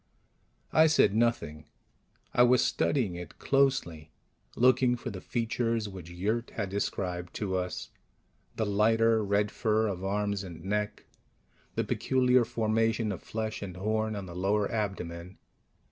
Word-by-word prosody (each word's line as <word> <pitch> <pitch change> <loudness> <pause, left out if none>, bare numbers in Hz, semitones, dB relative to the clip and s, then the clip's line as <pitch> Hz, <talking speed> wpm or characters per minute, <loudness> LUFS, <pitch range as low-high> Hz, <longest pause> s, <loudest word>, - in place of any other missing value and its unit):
I 160 +1 +6
said 150 -10 +4
nothing. 110 -10 0 0.7
I - - +4
was 125 0 +5
studying 120 -11 +1
it 90 0 -8
closely, 130 - +1 0.5
looking 125 0 +4
for 120 0 -6
the 95 -3 -7
features 115 -1 -1
which 95 -4 -9
Yurt 105 +7 -2
had 105 -3 -2
described 90 -3 -3
to 95 -3 -2
us: 90 -1 -3 0.6
the 110 - 0
lighter 110 +2 +3
red 100 +1 +1
fur 110 -1 +1
of 95 -3 -3
arms 100 0 -1
and 85 -2 -9
neck, 105 +1 -2 0.7
the - - +1
peculiar 130 -1 +2
formation 115 0 0
of 95 - -5
flesh 110 -1 -4
and 90 -3 -6
horn 110 +2 -1
on 100 -2 -5
the 85 -2 -9
lower 100 +3 +1
abdomen. 90 -4 -4
105 Hz, 140 wpm, -29 LUFS, 95-115 Hz, 0.7 s, I